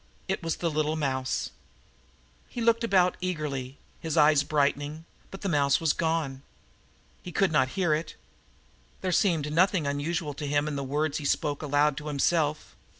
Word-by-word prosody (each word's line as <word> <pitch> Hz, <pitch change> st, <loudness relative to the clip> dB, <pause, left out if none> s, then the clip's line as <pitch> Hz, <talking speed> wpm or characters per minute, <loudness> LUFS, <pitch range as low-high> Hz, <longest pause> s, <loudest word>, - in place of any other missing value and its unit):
It 190 Hz, 0 st, -2 dB
was 165 Hz, -2 st, -1 dB
the 170 Hz, -2 st, -2 dB
little 155 Hz, +1 st, 0 dB
mouse. 130 Hz, -4 st, -2 dB, 1.0 s
He -, -, -6 dB
looked 230 Hz, 0 st, +2 dB
about 185 Hz, -5 st, +3 dB
eagerly, 145 Hz, -7 st, -3 dB, 0.2 s
his 160 Hz, -1 st, -3 dB
eyes 150 Hz, -1 st, +6 dB
brightening, 145 Hz, +2 st, -1 dB, 0.2 s
but 195 Hz, -, -10 dB
the 200 Hz, -, -2 dB
mouse 140 Hz, -5 st, +3 dB
was 160 Hz, -3 st, +2 dB
gone. 160 Hz, -5 st, -1 dB, 0.8 s
He 180 Hz, -, -8 dB
could 195 Hz, +1 st, +2 dB
not 130 Hz, -4 st, +3 dB
hear 175 Hz, -5 st, +2 dB
it. 155 Hz, +1 st, -3 dB, 0.9 s
There 185 Hz, -, -1 dB
seemed 165 Hz, -5 st, +1 dB
nothing 180 Hz, -1 st, +3 dB
unusual 145 Hz, +2 st, -2 dB
to 145 Hz, +1 st, -5 dB
him 145 Hz, +1 st, +1 dB
in 150 Hz, -, -3 dB
the 140 Hz, -, -3 dB
words 145 Hz, +3 st, -1 dB
he 145 Hz, -, -7 dB
spoke 145 Hz, 0 st, 0 dB
aloud 145 Hz, -1 st, +2 dB
to 155 Hz, 0 st, -6 dB
himself. 150 Hz, +1 st, 0 dB
155 Hz, 165 wpm, -27 LUFS, 145-170 Hz, 1.0 s, eyes